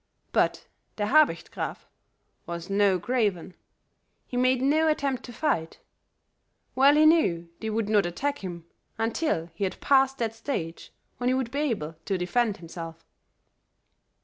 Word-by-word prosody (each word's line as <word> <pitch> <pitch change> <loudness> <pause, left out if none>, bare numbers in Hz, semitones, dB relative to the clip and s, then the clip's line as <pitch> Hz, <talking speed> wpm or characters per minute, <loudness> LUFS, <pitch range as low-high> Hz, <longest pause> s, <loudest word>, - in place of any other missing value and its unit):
But - - +1 0.3
Der 205 - -1
Habicht 310 +2 +3
Graf - - -5 0.6
was 170 +2 -6
no 200 -2 +3
craven; 205 -6 -1 0.7
he - - -8
made 255 +1 +3
no 300 +5 +3
attempt 275 -4 0
to 245 - -9
fight; 220 - -1 1.0
well 275 +2 +5
he 305 +1 +5
knew 180 - +3
they 220 - -3
would 220 -1 -1
not 210 -4 +3
attack 285 +12 -2
him 175 -3 -7 0.3
until 225 - -1
he 170 - -4
had 190 -1 -2
passed 270 -1 +3
that 225 -3 -1
stage 225 - -5 0.3
when 245 - -2
he 255 - +3
would 260 -3 -2
be 280 - -2
able 200 - -2
to 195 - 0
defend 205 +4 0
himself. 165 -1 -9
225 Hz, 150 wpm, -27 LUFS, 180-270 Hz, 1.0 s, well